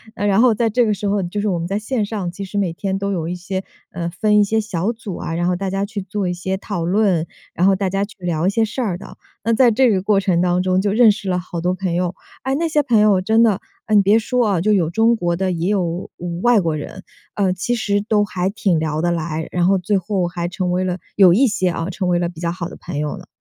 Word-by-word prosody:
呃， 205 Hz, -, -2 dB
然 200 Hz, +2 st, +3 dB
后 250 Hz, -3 st, +5 dB
在 225 Hz, +1 st, +1 dB
这 240 Hz, +2 st, +2 dB
个 210 Hz, -, +1 dB
时 205 Hz, +1 st, -3 dB
候， 200 Hz, 0 st, +1 dB
嗯， 175 Hz, -, -4 dB
就 205 Hz, +2 st, -3 dB
是 210 Hz, -, -1 dB
我 175 Hz, -2 st, -1 dB
们 170 Hz, -, -3 dB
在 200 Hz, +2 st, -1 dB
线 215 Hz, 0 st, -1 dB
上， 200 Hz, -5 st, -4 dB
其 195 Hz, +2 st, -7 dB
实 205 Hz, +2 st, -6 dB
每 190 Hz, -4 st, +1 dB
天 195 Hz, +2 st, -2 dB
都 200 Hz, 0 st, -2 dB
有 165 Hz, -4 st, -2 dB
一 180 Hz, -, -3 dB
些， 190 Hz, +2 st, -4 dB, 0.3 s
呃， 170 Hz, -1 st, -3 dB
分 210 Hz, +4 st, +2 dB
一 -, -, +6 dB
些 220 Hz, +2 st, +1 dB
小 210 Hz, 0 st, -2 dB
组 215 Hz, -5 st, -7 dB
啊， 165 Hz, -, -4 dB
然 175 Hz, +1 st, 0 dB
后 180 Hz, -, +1 dB
大 195 Hz, +1 st, -3 dB
家 195 Hz, +1 st, -1 dB
去 205 Hz, -1 st, -5 dB
做 195 Hz, 0 st, -3 dB
一 -, -, -1 dB
些 190 Hz, +2 st, -3 dB
讨 190 Hz, -4 st, -4 dB
论， 185 Hz, -4 st, +2 dB, 0.3 s
然 180 Hz, +3 st, +2 dB
后 195 Hz, -, +4 dB
大 190 Hz, -1 st, -1 dB
家 195 Hz, +2 st, 0 dB
去 210 Hz, -, -16 dB
聊 175 Hz, -1 st, -1 dB
一 -, -, +4 dB
些 225 Hz, +2 st, +1 dB
事 225 Hz, +4 st, -3 dB
儿 195 Hz, -7 st, -1 dB
的。 200 Hz, -, -12 dB, 0.3 s
那 230 Hz, +1 st, +1 dB
在 245 Hz, +1 st, +5 dB
这 245 Hz, +2 st, +3 dB
个 190 Hz, -3 st, +1 dB
过 200 Hz, 0 st, +2 dB
程 185 Hz, -3 st, +1 dB
当 180 Hz, 0 st, +1 dB
中， 185 Hz, 0 st, +2 dB
就 205 Hz, -, 0 dB
认 225 Hz, 0 st, +6 dB
识 200 Hz, -2 st, -5 dB
了 180 Hz, -, +1 dB
好 175 Hz, -1 st, -6 dB
多 180 Hz, +1 st, +1 dB
朋 185 Hz, -2 st, -3 dB
友。 180 Hz, 0 st, -1 dB, 0.3 s
哎， 265 Hz, +1 st, 0 dB
那 330 Hz, +3 st, 0 dB
些 305 Hz, -2 st, +2 dB
朋 240 Hz, -6 st, +2 dB
友 205 Hz, -3 st, +4 dB
真 220 Hz, +4 st, +3 dB
的， 210 Hz, -3 st, +3 dB, 0.3 s
哎， 215 Hz, -, -2 dB
你 205 Hz, -, +7 dB
别 200 Hz, +3 st, +4 dB
说 230 Hz, -2 st, +1 dB
哦， 165 Hz, -, 0 dB
就 215 Hz, +2 st, +2 dB
有 170 Hz, -6 st, +2 dB
中 225 Hz, +6 st, +3 dB
国 175 Hz, -4 st, -1 dB
的， 185 Hz, +1 st, -1 dB
也 175 Hz, +2 st, -1 dB
有 180 Hz, -4 st, -1 dB, 0.3 s
外 240 Hz, -1 st, +4 dB
国 165 Hz, -4 st, 0 dB
人， 155 Hz, +5 st, -7 dB, 0.3 s
呃， 195 Hz, -3 st, +1 dB
其 215 Hz, +7 st, -1 dB
实 205 Hz, -3 st, 0 dB
都 210 Hz, 0 st, +1 dB
还 190 Hz, -2 st, -2 dB
挺 195 Hz, -5 st, 0 dB
聊 155 Hz, 0 st, -1 dB
得 175 Hz, 0 st, +1 dB
来， 160 Hz, -1 st, -3 dB
然 175 Hz, 0 st, +1 dB
后 195 Hz, 0 st, +4 dB
最 195 Hz, +3 st, 0 dB
后 185 Hz, -1 st, -1 dB
还 175 Hz, 0 st, -3 dB
成 180 Hz, 0 st, -2 dB
为 180 Hz, +1 st, 0 dB
了- 180 Hz, -1 st, -1 dB, 0.2 s
有 190 Hz, -3 st, +7 dB
一 265 Hz, +8 st, +4 dB
些 205 Hz, -5 st, +1 dB
哦- 170 Hz, +1 st, -3 dB
成 185 Hz, -1 st, -2 dB
为 175 Hz, -, +3 dB
了 175 Hz, 0 st, 0 dB
比 170 Hz, -2 st, -9 dB
较 170 Hz, -1 st, -1 dB
好 170 Hz, -1 st, -4 dB
的 -, -, -10 dB
朋 170 Hz, -4 st, -7 dB
友 150 Hz, 0 st, -2 dB
了。 -, -, -12 dB
190 Hz, 310 characters per minute, -20 LUFS, 175-210 Hz, 0.3 s, 你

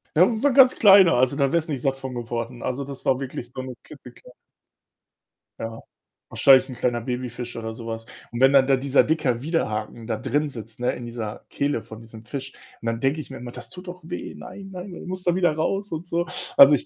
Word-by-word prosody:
Das 175 Hz, +4 st, +7 dB
ist 225 Hz, +1 st, -3 dB
'n 285 Hz, -, +4 dB
ganz 265 Hz, -2 st, +8 dB
kleiner, 195 Hz, -5 st, +7 dB
also 130 Hz, +2 st, +3 dB
da 140 Hz, -2 st, +1 dB
wärst 165 Hz, -1 st, 0 dB
nicht 140 Hz, -5 st, -2 dB
satt 135 Hz, -1 st, +1 dB
von 130 Hz, -1 st, -6 dB
geworden. 120 Hz, 0 st, -4 dB
Also, 130 Hz, +2 st, -2 dB
das 135 Hz, 0 st, -8 dB
war 130 Hz, -, +2 dB
wirklich 125 Hz, -3 st, -6 dB
so 130 Hz, -, -4 dB
'ne 130 Hz, -1 st, -7 dB
klitzeklei 125 Hz, -4 st, -14 dB, 1.3 s
Ja. 115 Hz, 0 st, -6 dB, 0.5 s
Wahrscheinlich 135 Hz, 0 st, +5 dB
'n 130 Hz, -, -6 dB
kleiner 120 Hz, -1 st, 0 dB
Babyfisch 125 Hz, 0 st, -4 dB
oder 110 Hz, -1 st, -5 dB
so 115 Hz, 0 st, -9 dB
was 115 Hz, 0 st, -5 dB, 0.3 s
und 120 Hz, -, -5 dB
wenn 135 Hz, +2 st, +6 dB
dann 135 Hz, -1 st, +6 dB
da 135 Hz, -, +5 dB
dieser 135 Hz, +1 st, +3 dB
dicker 150 Hz, -7 st, 0 dB
Widerhaken 115 Hz, -8 st, -2 dB
da 115 Hz, -, -1 dB
drinsitzt, 120 Hz, -4 st, -2 dB
ne, 125 Hz, -, +1 dB
in 120 Hz, -, -7 dB
dieser 115 Hz, -3 st, -6 dB
Kehle 140 Hz, -4 st, -1 dB
von 110 Hz, -, -11 dB
diesem 115 Hz, -1 st, -12 dB
Fisch 135 Hz, +2 st, -6 dB, 0.3 s
und -, -, -10 dB
dann 115 Hz, 0 st, -1 dB
denke 135 Hz, +3 st, +1 dB
ich 145 Hz, -, -7 dB
mir -, -, -7 dB
immer: 120 Hz, 0 st, -8 dB
„Das -, -, -8 dB
tut 180 Hz, 0 st, -9 dB
doch 180 Hz, +1 st, -8 dB
weh. -, -, -6 dB
Nein, 195 Hz, +1 st, -10 dB
nein.“ 185 Hz, +1 st, -7 dB
Der -, -, -9 dB
muss 185 Hz, 0 st, -4 dB
da 175 Hz, -, +2 dB
wieder 175 Hz, -3 st, +3 dB
raus 195 Hz, +6 st, -1 dB
und 165 Hz, +2 st, -5 dB
so. 170 Hz, 0 st, 0 dB, 0.3 s
Also, 140 Hz, +1 st, +9 dB
ich 135 Hz, -, -4 dB
135 Hz, 230 wpm, -24 LUFS, 120-160 Hz, 1.3 s, Also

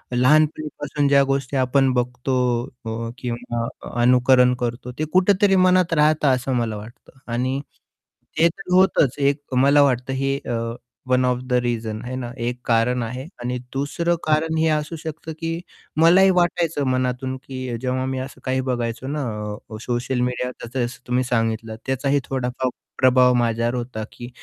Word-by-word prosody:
लहानपणीपासून 145 Hz, +1 st, +2 dB
ज्या 140 Hz, 0 st, +5 dB
गोष्टी 135 Hz, 0 st, -1 dB
आपण 130 Hz, +1 st, +3 dB
बघतो 125 Hz, +1 st, -1 dB, 0.5 s
अ, 115 Hz, +1 st, -4 dB
किंवा 120 Hz, -1 st, -3 dB, 0.3 s
अनुकरण 125 Hz, 0 st, +5 dB
करतो 120 Hz, +1 st, -3 dB
ते 155 Hz, -, +1 dB
कुठेतरी 195 Hz, +1 st, +4 dB
मनात 185 Hz, -2 st, +4 dB
राहतं 150 Hz, -1 st, +3 dB
असं 130 Hz, +1 st, -3 dB
मला 115 Hz, -3 st, -1 dB
वाटतं 115 Hz, +5 st, -13 dB
आणि 130 Hz, +3 st, 0 dB, 0.8 s
ते 165 Hz, -, +6 dB, 0.2 s
होतंच 180 Hz, -8 st, +4 dB
एक 140 Hz, -1 st, 0 dB
मला 140 Hz, +3 st, +5 dB
वाटतं 130 Hz, -1 st, +1 dB
हे 135 Hz, +1 st, 0 dB
अ, 120 Hz, -2 st, -1 dB, 0.5 s
वन 130 Hz, 0 st, +3 dB
ऑफ 125 Hz, -1 st, +2 dB
द -, -, 0 dB
रीझन्स 115 Hz, -2 st, -1 dB
आहे 130 Hz, +1 st, -4 dB
ना. 125 Hz, -2 st, -4 dB
एक 120 Hz, +1 st, -3 dB
कारण 120 Hz, +1 st, +2 dB
आहे 125 Hz, +3 st, -5 dB, 0.2 s
आणि 125 Hz, +1 st, -2 dB, 0.2 s
दुसरं 145 Hz, +5 st, 0 dB
कारण 155 Hz, +1 st, +1 dB
हे 160 Hz, 0 st, +2 dB
असू 155 Hz, +2 st, -1 dB
शकतं 160 Hz, 0 st, -7 dB
की 165 Hz, 0 st, -2 dB, 0.4 s
मलाही 185 Hz, +4 st, +7 dB
वाटायचं 170 Hz, -4 st, +1 dB
मनातून 130 Hz, 0 st, -1 dB
की 130 Hz, -3 st, -5 dB
जेव्हा 130 Hz, 0 st, -1 dB
मी 130 Hz, 0 st, -2 dB
असं 130 Hz, +1 st, -8 dB
काही 130 Hz, 0 st, 0 dB
बघायचो 120 Hz, 0 st, -2 dB
ना, 145 Hz, 0 st, -2 dB, 0.5 s
अ, 110 Hz, -, -7 dB
सोशल 125 Hz, +1 st, -2 dB
मीडिया 125 Hz, 0 st, -1 dB, 0.3 s
जसं 120 Hz, -1 st, +1 dB, 0.2 s
तुम्ही 125 Hz, +1 st, +1 dB
सांगितलं 115 Hz, -2 st, -1 dB
त्याचाही 135 Hz, +2 st, +1 dB
थोडा 130 Hz, -2 st, -1 dB
फार 130 Hz, -, +1 dB, 0.3 s
प्रभाव 125 Hz, -1 st, +5 dB
माझ्यावर 120 Hz, 0 st, +1 dB
होता, 120 Hz, -3 st, -4 dB
की 120 Hz, 0 st, -9 dB
130 Hz, 155 wpm, -22 LUFS, 125-145 Hz, 0.8 s, मलाही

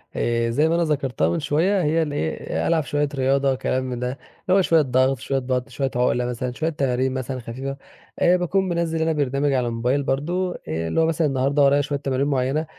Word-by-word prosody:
آآ 115 Hz, 0 st, 0 dB
زي 150 Hz, +7 st, +2 dB
ما 165 Hz, -, +2 dB
أنا 170 Hz, -, +2 dB
ذكرتها 135 Hz, -, 0 dB
من 85 Hz, -, 0 dB
شوية 180 Hz, +6 st, +1 dB
هي 160 Hz, +2 st, +2 dB
الإيه 145 Hz, -, -2 dB
ألعب 165 Hz, -2 st, +2 dB
شوية 145 Hz, +1 st, -1 dB
رياضة، 135 Hz, 0 st, +2 dB
كلام 130 Hz, 0 st, -1 dB
من 125 Hz, -2 st, -4 dB
ده، 125 Hz, 0 st, -2 dB
اللي 140 Hz, +8 st, -2 dB
هو 195 Hz, -, +5 dB
شوية 165 Hz, -3 st, +4 dB
ضغط، 130 Hz, -1 st, +2 dB
شوية 135 Hz, +3 st, -1 dB
بطن، 125 Hz, 0 st, -2 dB
شوية 135 Hz, +1 st, -2 dB
عقلة 125 Hz, 0 st, +1 dB
مثلًا، 125 Hz, +1 st, -3 dB
شوية 155 Hz, +6 st, -2 dB
تمارين 130 Hz, -4 st, 0 dB
مثلًا 130 Hz, 0 st, -4 dB
خفيفة، 130 Hz, +4 st, -6 dB, 0.4 s
آآ 180 Hz, +1 st, +4 dB
باكون 190 Hz, +2 st, 0 dB
منزِّل 170 Hz, -2 st, -1 dB
أنا 160 Hz, 0 st, +1 dB
برنامج 140 Hz, -1 st, 0 dB
على 125 Hz, -2 st, +1 dB
الموبايل 125 Hz, +4 st, 0 dB
برضه 175 Hz, +7 st, -1 dB
آآ 80 Hz, +1 st, -2 dB
اللي 120 Hz, -, 0 dB
هو -, -, +4 dB
مثلًا 165 Hz, -1 st, +1 dB
النهاردة 140 Hz, +1 st, +1 dB
ورايا 140 Hz, +1 st, +4 dB
شوية 145 Hz, 0 st, -3 dB
تمارين 135 Hz, 0 st, -1 dB
معيّنة 135 Hz, +3 st, 0 dB
135 Hz, 210 wpm, -23 LUFS, 125-155 Hz, 0.4 s, هو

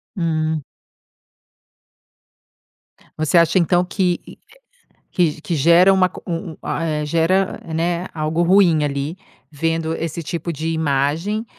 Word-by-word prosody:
Hum. 160 Hz, -4 st, -1 dB, 2.5 s
Você 155 Hz, +2 st, +2 dB
acha 170 Hz, +2 st, +4 dB
então 175 Hz, +1 st, +2 dB
que 180 Hz, -1 st, 0 dB, 0.9 s
que 160 Hz, -3 st, 0 dB
que 170 Hz, -, -2 dB
gera 170 Hz, +6 st, +5 dB
uma 185 Hz, -1 st, +4 dB
co -, -, -11 dB
um 170 Hz, 0 st, -4 dB
um -, -, -17 dB, 0.2 s
eh, 155 Hz, -2 st, -2 dB
gera, 170 Hz, +5 st, +1 dB, 0.2 s
né, 170 Hz, +2 st, -1 dB
algo 155 Hz, +1 st, -1 dB
ruim 175 Hz, -4 st, +4 dB
ali, 145 Hz, +4 st, -3 dB, 0.3 s
vendo 165 Hz, +2 st, -1 dB
esse 165 Hz, +1 st, -4 dB
tipo 170 Hz, +2 st, -4 dB
de 160 Hz, +2 st, -3 dB
imagem, 160 Hz, +7 st, -1 dB
165 Hz, 120 wpm, -20 LUFS, 155-175 Hz, 2.5 s, gera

